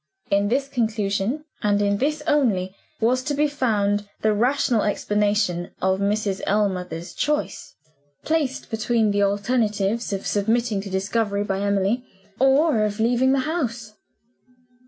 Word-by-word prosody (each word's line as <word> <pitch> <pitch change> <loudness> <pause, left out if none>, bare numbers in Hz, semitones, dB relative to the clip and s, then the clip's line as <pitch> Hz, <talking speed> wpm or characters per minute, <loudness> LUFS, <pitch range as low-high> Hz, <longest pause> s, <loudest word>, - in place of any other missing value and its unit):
In 200 0 +3
this 270 +5 0
conclusion, 220 +1 -1 0.2
and 205 -1 +2
in 200 0 +1
this 295 +2 -1
only, 200 -10 +1 0.2
was 245 +3 +2
to 290 - -1
be 300 +1 +2
found 210 -7 0
the 215 0 +3
rational 240 +1 +2
explanation 205 -4 0
of 190 +1 +1
Mrs. 200 -1 0
Ellmother's 180 -4 -1
choice 300 0 -2 0.5
placed 300 -5 -1
between 220 -1 +1
the 205 0 +1
alternatives 210 +1 0
of 195 -1 -3
submitting 220 0 0
to 200 - -8
discovery 200 +2 -1
by 195 -1 -2
Emily, 200 +4 0 0.4
or 270 -2 +4
of 210 0 -2
leaving 245 +3 +3
the 275 - +2
house. 245 -8 -3
215 Hz, 135 wpm, -23 LUFS, 200-250 Hz, 0.5 s, or